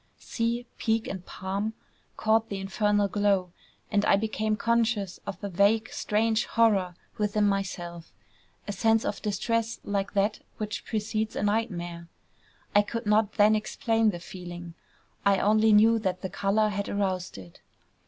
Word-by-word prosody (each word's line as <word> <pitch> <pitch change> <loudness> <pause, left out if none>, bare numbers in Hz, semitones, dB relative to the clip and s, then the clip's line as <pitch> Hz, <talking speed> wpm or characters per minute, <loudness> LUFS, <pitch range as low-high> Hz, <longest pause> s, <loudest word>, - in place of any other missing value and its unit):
Sea, 235 +1 -2
peak, 225 0 0
and 190 -2 -5
palm 200 +3 -3 0.4
caught 220 +1 +2
the 200 - -3
infernal 205 +1 +1
glow; 200 -3 +1 0.4
and 205 -1 +2
I - - +5
became 215 +1 -1
conscious 230 -4 0
of 195 -3 -4
a - - -1
vague 200 +5 +2
strange 220 +1 +1
horror 200 -6 +2 0.2
within 210 0 +1
myself, 175 -4 -3 0.6
a - - -2
sense 225 +2 +2
of - - -3
distress 230 +2 -1
like 200 -1 -2
that 205 +1 +1 0.2
which 210 -1 -4
precedes 215 0 -2
a - - -2
nightmare. 175 -6 -2 0.7
I 205 - +6
could 230 +3 -5
not 210 0 +2
then 215 0 +5
explain 225 +1 +1
the 175 -4 -4
feeling; 175 -1 -9 0.5
I 200 -1 +4
only 215 +2 +4
knew 225 +2 +6
that 185 -3 -2
the 190 - -2
color 205 +3 +1
had 200 0 -3
aroused 190 - -2
it. 90 -3 -13
205 Hz, 150 wpm, -27 LUFS, 195-220 Hz, 0.7 s, I